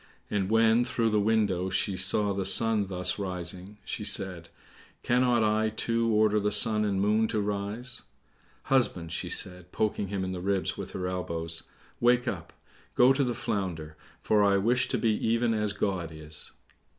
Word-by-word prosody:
And 100 -2 -1
when, 115 +1 +4
through 115 -2 0
the 105 - +2
window, 100 -4 +1
she 95 +1 0
saw 100 +2 +2
the 95 0 -2
sun 105 +1 +3
thus 90 0 -2
rising, 90 +1 -5
she 105 - -4
said, 95 -4 -1 0.5
"Cannot 120 -1 +2
I, 110 +1 +1
too, 115 +1 -1
order 105 0 +3
the 105 0 -1
sun 105 +1 +4
and 100 -2 -1
moon 105 +3 +2
to 110 - -2
rise?" 105 +4 -3 0.6
"Husband," 95 -11 +1
she 85 - -3
said, 90 -1 -2
poking 105 -2 -1
him 95 0 -3
in 95 - -3
the 90 -1 -5
ribs 95 0 -1
with 95 -1 -8
her 90 - -4
elbows, 85 -3 -1 0.3
"wake 125 +1 +3
up! 85 -8 -4 0.4
go 125 +2 +6
to 140 +1 +1
the 120 -2 -2
Flounder, 85 -9 -4 0.3
for 105 -1 +3
I 100 -1 +3
wish 120 +6 +2
to - - -1
be 115 - +1
even 115 +2 0
as 105 -1 -1
God 95 -4 -2
is." 75 -1 -8
100 Hz, 175 wpm, -28 LUFS, 95-110 Hz, 0.6 s, go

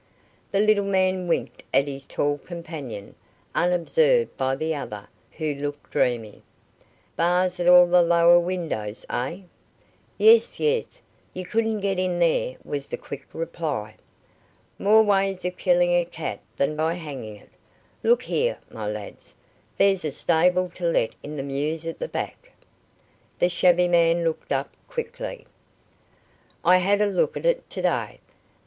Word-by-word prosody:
The 195 - 0
little 210 -1 +4
man 185 -2 +1
winked 170 - -2
at 140 - +3
his 135 -1 -7
tall 145 0 -1
companion, 155 - -8 0.4
unobserved 470 - +2
by 130 0 0
the 160 +3 -2
other, 105 -8 -6 0.3
who 155 -2 -2
looked 145 +1 -6
dreamy. 115 -4 -1 0.7
"Bars 180 +2 +1
at 175 - 0
all 180 0 +9
the 175 0 +4
lower 170 0 +5
windows, 165 - -4
eh?" 135 +10 -3 0.8
"Yes, 450 +1 +5
yes. 455 +1 0 0.4
You 185 0 -5
couldn't 220 +1 0
get 195 -2 0
in 185 -1 0
there," 165 -6 +1
was 140 -1 -4
the - - -4
quick 140 -1 -9
reply. 155 -10 -4 0.8
"More 215 +2 +5
ways 195 -3 +1
of 180 0 -2
killing 175 -1 +2
a 175 - +3
cat 165 -2 -6 0.2
than 145 +2 0
by 160 +2 0
hanging 140 -10 -7
it. 105 - -19 0.5
Look 475 +1 +3
here, 485 +2 0
my 110 -2 -5
lads, 105 -1 -7 0.4
there's 195 -2 +3
a 155 - -1
stable 180 +5 +2
to 175 - -4
let 140 -9 +1
in 150 +1 -7
the 135 - -3
mews 150 +4 -3
at 165 - -5
the - - -3
back." - - -6 0.9
The 175 - +2
shabby 180 0 +4
man 170 -1 +3
looked 165 -1 -3
up 135 0 -1
quickly. - - -6 1.2
"I 180 - +7
had 200 +3 +2
a - - +4
look 195 -3 0
at - - -6
it - - +1
to - - -5
day. - - -1
175 Hz, 150 wpm, -24 LUFS, 145-185 Hz, 1.2 s, all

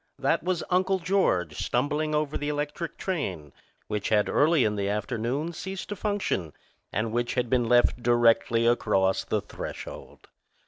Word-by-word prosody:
That - - +1
was 180 0 -1
Uncle 185 +1 +3
George 170 - +1
stumbling 150 +4 0
over 150 0 -1
the 145 - -2
electric 150 +3 -3
train, 95 - -3 0.3
which 105 -1 -3
had 105 -1 +3
early 155 -2 +4
in 105 -1 +1
the 100 -1 -1
afternoon 120 +9 -2
ceased 190 +4 -6
to 205 - -3
function 195 - -2 0.4
and 110 0 -1
which 120 +1 -1
had 125 -2 -1
been 120 -3 +2
left 120 0 +4
directly 115 -1 +3
across 100 -5 +2
the - - -1
threshold. - - -8
125 Hz, 150 wpm, -27 LUFS, 110-160 Hz, 0.4 s, early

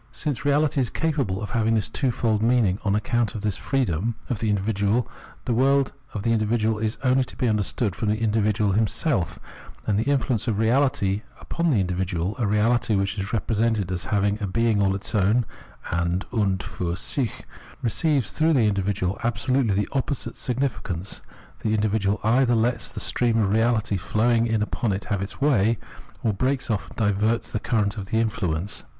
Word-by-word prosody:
Since 145 -7 -3
reahty 145 0 +2
is 125 -3 +1
capable 140 - -1
of 105 - -5
haviag 115 -2 +2
this 110 - +1
twofold 115 -5 0
mean 120 0 +3
ing 95 +1 0
on 100 -1 +1
account 115 +1 0
of 105 - -4
this 105 -3 -1
freedom 115 - -1 0.2
of 115 - -1
the 110 - 0
individual, 105 +3 +1 0.4
the 120 - 0
world 135 +3 +3 0.2
of 100 - -3
the 115 - +1
individual 110 0 +1
is 110 0 -1
only 130 0 +3
to - - -9
be 125 - 0
understood 105 -1 0
from 110 - -1
the 105 - +2
individual 105 -1 +1
himself; 105 - 0 0.5
and 105 -1 +1
the 120 +5 0
influence 130 -5 0
of 110 - +1
reahty 110 -3 +2 0.2
upon 170 0 -1
the 135 - +3
individual, 90 +1 -1
a 115 - +1
reality 110 +2 +2
which 100 +1 -1
is 100 +1 -3
represented 110 -2 0
as 90 -2 -3
having 100 +1 0
a 100 - -1
being 110 +1 +2
all 95 -1 +2
its 100 - -5
own 110 +4 +3 0.5
{an 85 +2 0
und 100 -5 +1
fiir 85 0 -3
sich), 125 +2 -2 0.4
receives 130 - +1
through 160 +1 +2
this 120 -7 +4
individual 100 -1 -1
absolutely 120 -1 +1
the 105 +1 0
opposite 135 0 -2
significance 110 -8 -3 0.2
— - - -25
the 110 0 +1
individual 105 -1 +1
either 120 +2 +3
lets 115 +1 0
the - - -6
stream 120 -2 +1
of 105 -3 +2
reahty 110 -2 +2
flowing 115 +4 +2
in 110 -2 +1
upon 105 +1 -1
it 95 - -4
have 100 -2 -1
its 100 - -6
way, 115 -6 +3 0.5
or 110 - +2
breaks 130 +4 0
off 105 - -1
and - - -14
diverts 110 +2 +1
the 110 - -1
current 105 -1 0
of - - -3
its 95 +3 -9
influence. 100 -5 0
110 Hz, 185 wpm, -24 LUFS, 100-120 Hz, 0.5 s, this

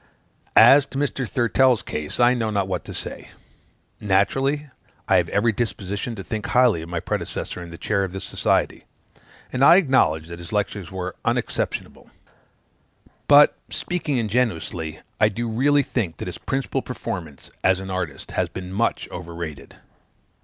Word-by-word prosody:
As 140 0 +8
to 135 - -7
Mr. 135 -3 -1
Thurtell's 125 0 +3
case, 75 0 -5
I 120 +1 +6
know 115 -3 -1
not 100 -3 0
what 90 -2 -3
to - - -7
say. - - -5 0.7
Naturally, 135 +9 +1 0.4
I - - +5
have - - +1
every 115 +3 +2
disposition 100 0 -3
to 95 - -7
think 110 +1 -4
highly 125 -9 +3
of 80 - -9
my 85 0 -2
predecessor 90 - -4
in 85 - -8
the 85 - -9
chair 100 +1 0
of 95 - -3
this 95 +1 -6
society; - - 0 0.7
and 130 +1 +1
I 170 - +9
acknowledge 130 - +3
that 85 0 -8
his 85 - -8
lectures 100 -4 -2
were 90 -1 -5
unexceptionable. - - -2 1.2
But, 145 0 +7
speaking 170 -6 -2
ingenuously, 105 -8 -1 0.2
I 105 - +5
do 115 +3 -3
really 140 +6 +3
think 105 -11 -2
that - - -6
his - - -6
principal 135 0 -2
performance, 80 -7 -6
as 95 0 +3
an 95 0 -6
artist, 85 -7 -4
has - - -1
been 95 0 -7
much 115 +4 0
overrated. 85 -5 -7
105 Hz, 160 wpm, -23 LUFS, 90-125 Hz, 1.2 s, I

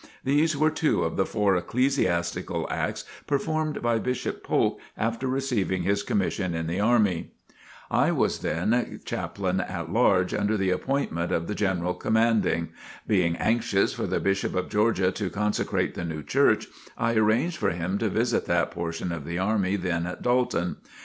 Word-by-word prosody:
These 145 +3 +2
were 155 +2 +3
two 155 0 +1
of 80 - -2
the 95 - +1
four 105 -3 +2
ecclesiastical 90 -5 0
acts - - -2 0.2
performed 155 +1 -1
by 120 -1 +2
Bishop 125 +2 -3
Polk - - +1 0.2
after 115 +3 -1
receiving 125 -9 0
his 100 +2 +1
commission 95 -3 -1
in 80 0 -2
the 85 +4 -2
army. 105 -6 +2 0.6
I - - +3
was - - +1
then 110 +10 0
Chaplain - - -2
at - - -4
Large - - +3
under 105 +1 +1
the 95 -2 +1
appointment 90 - -1
of 85 - 0
the 105 - -3
General 90 -4 0
Commanding. 110 -4 +1 0.4
Being 90 -5 +2
anxious 110 -3 +1
for - - -3
the - - 0
Bishop 100 0 0
of 90 0 -1
Georgia 105 -3 +2
to 100 -2 -3
consecrate 105 +4 -1
the - - -5
new 80 -3 -4
church, - - +3 0.3
I 115 0 +1
arranged 110 +10 +2
for - - +1
him 90 +3 -2
to 110 - 0
visit 115 +4 0
that 85 0 +1
portion 85 +1 -4
of 85 -3 -4
the 85 +4 -4
army 100 0 +1
then 90 -3 -1
at 90 - -6
Dalton. 120 -8 +1
100 Hz, 165 wpm, -26 LUFS, 90-115 Hz, 0.6 s, were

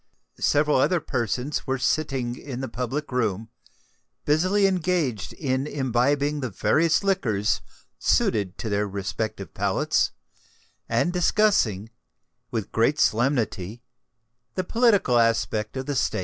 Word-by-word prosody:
Several 150 0 +3
other 175 +7 +3
persons 125 0 -2
were 135 0 0
sitting 130 -2 -1
in 130 -1 -7
the 130 - -3
public 130 +5 -4
room, 110 -3 -1 0.8
busily 185 +7 +3
engaged 170 - 0
in 135 -1 -1
imbibing 140 +2 0
the 130 -3 -3
various 155 - +2
liquors 115 - +1 0.4
suited 100 -4 +1
to - - -5
their 105 0 0
respective 100 0 -4
palates, - - +1 0.8
and 175 - +1
discussing, 170 - +2 0.6
with 110 -4 -4
great 115 +7 +2
solemnity, 115 -4 0 0.7
the 185 - 0
political 200 - +3
aspect 115 0 0
of 130 - -3
the 145 - -2
State. 125 - 0
130 Hz, 120 wpm, -25 LUFS, 110-150 Hz, 0.8 s, Several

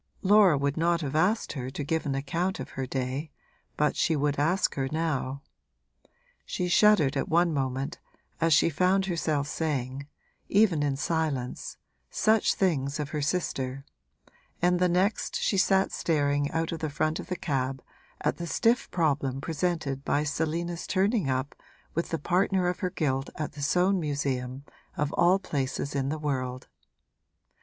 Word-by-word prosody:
Laura 195 -5 +6
would 140 +1 -1
not 170 +1 +2
have 145 -1 -3
asked 190 +8 +1
her 130 -3 -4
to 140 +2 -5
give 160 +2 -1
an 135 - -1
account 170 +8 -1
of - - -6
her 130 -1 -4
day, 130 +4 -3 0.5
but 150 0 +2
she 160 - +2
would 145 -1 0
ask 170 +6 +2
her 135 -1 -2
now. 145 -4 -2 1.0
She 180 - -2
shuddered 200 -9 +5
at - - -1
one 170 0 +3
moment, 135 0 -2 0.4
as 165 0 +2
she 150 - +5
found 185 +5 +2
herself 155 -5 -1
saying 140 -3 -3 0.4
even 195 -7 +4
in 145 -2 +1
silence 150 -5 -2 0.3
such 220 0 +2
things 145 -7 0
of 145 -2 -3
her 150 0 -3
sister, 140 -4 -2 0.7
and 180 0 +2
the 180 0 +3
next 190 +4 +1
she - - +1
sat 195 0 +3
staring 145 -3 +1
out 165 0 -1
of 165 - -4
the 155 - -2
front 155 +2 -1
of - - -7
the 185 - -2
cab 135 -5 -2 0.4
at - - 0
the 170 - -5
stiff 230 +7 +2
problem 140 -6 0
presented 155 -3 -2
by 145 +1 +1
Selina's 165 +3 -2
turning 200 - +1
up 130 +2 -1 0.4
with 170 - -2
the 165 - -1
partner 180 +3 +1
of 180 - -1
her 185 - -1
guilt 135 -7 -1
at 150 - -3
the 145 - -9
Soane 180 +6 +2
Museum, 140 -4 -2 0.3
of 150 0 -1
all 175 +2 +4
places 140 -6 -3
in 135 -1 -1
the 155 - -2
world. 130 -4 -3
155 Hz, 165 wpm, -28 LUFS, 140-175 Hz, 1.0 s, Laura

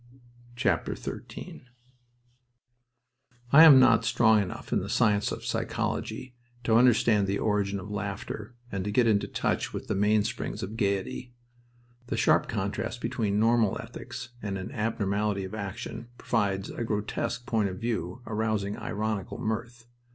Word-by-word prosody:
XIII - - -3 1.9
I 155 +3 +10
am 145 -5 +10
not 115 -3 +5
strong 110 -2 +4
enough 95 - -5
in - - +3
the - - -5
science 105 -1 +2
of - - -6
psychology 130 -1 -3 0.3
to 115 - +1
understand 115 -4 +4
the 100 +1 0
origin 100 -2 0
of 100 +2 -8
laughter 105 +2 -5 0.2
and 95 -1 -2
to 105 - -3
get 120 +4 +3
into 105 -3 +2
touch - - -1
with - - -5
the - - -2
mainsprings 105 +1 0
of 100 +4 -5
gaiety. 100 +3 -2 0.7
The - - -2
sharp - - +3
contrast - - -3
between 105 -2 -1
normal 115 -2 +3
ethics 125 -1 -8
and 100 -2 -3
an 95 - -6
abnormality 105 -2 -1
of 95 - -7
action 110 +3 -6
provides 100 -4 -1
a - - -4
grotesque 110 +2 -2
point 110 -6 +1
of 95 - -6
view 115 -2 -3
arousing 110 -2 -1
ironical 105 -2 -3
mirth. 115 +2 -4
105 Hz, 140 wpm, -28 LUFS, 100-115 Hz, 1.9 s, I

